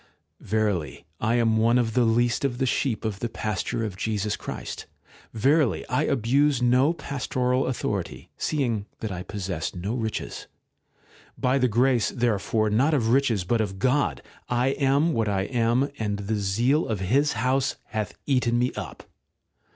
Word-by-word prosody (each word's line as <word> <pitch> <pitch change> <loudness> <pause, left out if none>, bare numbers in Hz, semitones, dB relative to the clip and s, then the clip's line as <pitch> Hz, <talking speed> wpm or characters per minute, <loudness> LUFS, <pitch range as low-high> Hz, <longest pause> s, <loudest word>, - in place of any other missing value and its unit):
*>^erily 105 -6 -1 0.2
I 115 +2 +1
am 115 -2 +3
one 115 +2 +4
of 115 -2 +1
the 125 0 +3
least 120 +3 +2
of 130 -3 0
the 130 - +1
sheep 125 -3 -1
of 105 -3 -2
the 120 - -2
pasture 105 0 -2
of 105 -4 -4
Jesus 105 +1 -1
Christ; - - -7 0.4
verily 135 +4 +2
I - - +1
abuse 135 +4 +2
no 125 +5 +3
pastoral 130 -4 -1
authority, 100 -7 -3
seeing 120 -9 -1
that 110 - -3
I 90 -1 -4
possess 90 -5 -4
no 95 +5 -3
riches. 115 -3 -4 0.9
By 130 +2 +2
the 125 - +3
grace, 120 +1 +2
therefore, 110 -2 0
not 135 +9 +3
of 115 -5 +1
riches, 120 -6 +2
but 115 +5 +1
of 95 -3 -3
God, 130 +7 +1 0.3
I 125 +2 +2
am 140 +4 +2
what 110 -4 0
I 95 -1 0
am, 120 +4 +1
and 105 -2 -1
the 105 +2 -2
zeal 115 +10 +1
of 105 -4 -2
His 135 +10 +2
house 130 +1 0
hath 105 -2 -3
eaten 125 -4 +2
me 125 +1 +1
up. - - -7
115 Hz, 160 wpm, -25 LUFS, 105-130 Hz, 0.9 s, one